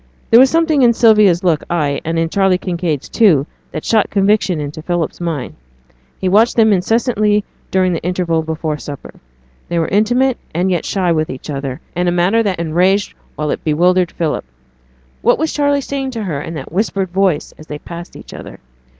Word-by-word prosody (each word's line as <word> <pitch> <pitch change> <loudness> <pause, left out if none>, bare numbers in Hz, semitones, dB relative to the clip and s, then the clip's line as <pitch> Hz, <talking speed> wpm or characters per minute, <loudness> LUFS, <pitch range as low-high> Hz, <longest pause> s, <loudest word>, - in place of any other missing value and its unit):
There 230 - +8
was 265 +1 +6
something 325 -2 +2
in 240 -2 +5
Sylvia's 210 -6 +4
look, 165 -4 +1
ay, 150 -5 -1
and 165 0 -2
in 165 0 +1
Charley 195 +1 +2
Kinraid's, 175 -6 -3
too, 175 - +3 0.3
that 155 - -6
shot 220 -3 +2
conviction 200 -4 +1
into 150 +1 -6
Philip's 175 0 -3
mind. 160 -7 -3 0.6
He 190 - -2
watched 215 +6 +3
them 220 -2 +4
incessantly 210 +1 +1 0.3
during 185 -1 +1
the 165 - -3
interval 175 -2 -1
before 160 -1 -3
supper; 145 -1 -9 0.6
they 170 - -1
were 165 - +1
intimate, 245 +5 +2 0.2
and 180 +2 +1
yet 175 - -1
shy 185 -3 0
with 155 -1 0
each 130 +3 -7
other, 135 -2 -5
in 180 +1 0
a - - +2
manner 180 +6 +2
that 200 -5 -1
enraged 180 +5 +1 0.2
while 150 -1 -2
it - - -4
bewildered 175 +3 +2
Philip. 160 -3 -2 0.8
What - - +3
was 320 0 -1
Charley 285 -1 +1
saying 270 0 -3
to 220 - -3
her 155 -7 -3
in 165 - -6
that 135 -3 -7
whispered 195 0 -1
voice, 185 -5 0
as 155 - -13
they 150 - -6
passed 170 +3 -10
each - - -12
other? - - -10
180 Hz, 190 wpm, -16 LUFS, 160-210 Hz, 0.8 s, There